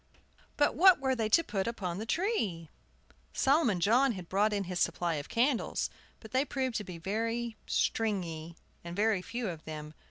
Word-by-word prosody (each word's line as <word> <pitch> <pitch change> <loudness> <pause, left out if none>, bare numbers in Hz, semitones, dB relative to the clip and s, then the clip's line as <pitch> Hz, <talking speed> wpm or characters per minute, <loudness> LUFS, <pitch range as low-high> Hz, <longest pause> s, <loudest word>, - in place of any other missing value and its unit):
But 290 - +3
what 370 0 +7
were 265 -1 +1
they 220 -3 -1
to 335 +10 +5
put 195 -7 -2
upon 190 -6 -3
the 220 - -5
tree? 220 - -1 0.6
Solomon 270 - +3
John 240 +8 +4
had 185 -4 -8
brought 205 +3 +2
in 200 -1 0
his 180 -1 -4
supply 175 -1 +1
of 145 - -6
candles; 245 +2 +1 0.3
but 220 - -12
they 260 +2 +2
proved 265 -3 -2
to 210 - -3
be 180 -3 -8
very 225 +6 -2
"stringy" 170 -7 -1 0.3
and 170 0 -6
very 210 -1 +2
few 235 +3 -4
of 165 -4 -6
them. 155 -1 -7
215 Hz, 180 wpm, -31 LUFS, 175-245 Hz, 0.6 s, what